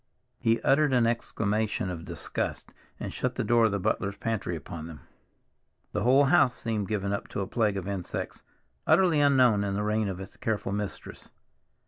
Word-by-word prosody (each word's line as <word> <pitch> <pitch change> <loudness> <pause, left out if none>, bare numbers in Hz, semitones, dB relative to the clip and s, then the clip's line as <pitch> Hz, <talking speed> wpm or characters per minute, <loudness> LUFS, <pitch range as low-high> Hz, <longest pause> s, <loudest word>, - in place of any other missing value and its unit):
He 115 0 +2
uttered 145 0 +3
an 120 -2 +4
exclamation 110 -4 -1
of 85 -2 -6
disgust, - - -4 0.3
and - - -5
shut - - -2
the - - -1
door 120 -1 +4
of 110 - +2
the 100 - -1
butler's 100 0 -1
pantry 110 -6 -2
upon 80 +1 -7
them. 80 -3 -10 0.9
The - - -2
whole 130 +4 +5
house 135 -5 +4
seemed 110 -4 -2
given 100 -1 -1
up 100 - -3
to - - -4
a - - -1
plague 105 -1 0
of 95 -1 -4
insects, 95 -3 -4 0.5
utterly 165 -2 +4
unknown 130 -7 +4
in 100 -1 -1
the 105 - -1
reign 105 0 0
of 95 -2 -4
its 95 - -10
careful 105 -3 -2
mistress. 100 0 -5
105 Hz, 180 wpm, -28 LUFS, 100-120 Hz, 0.9 s, whole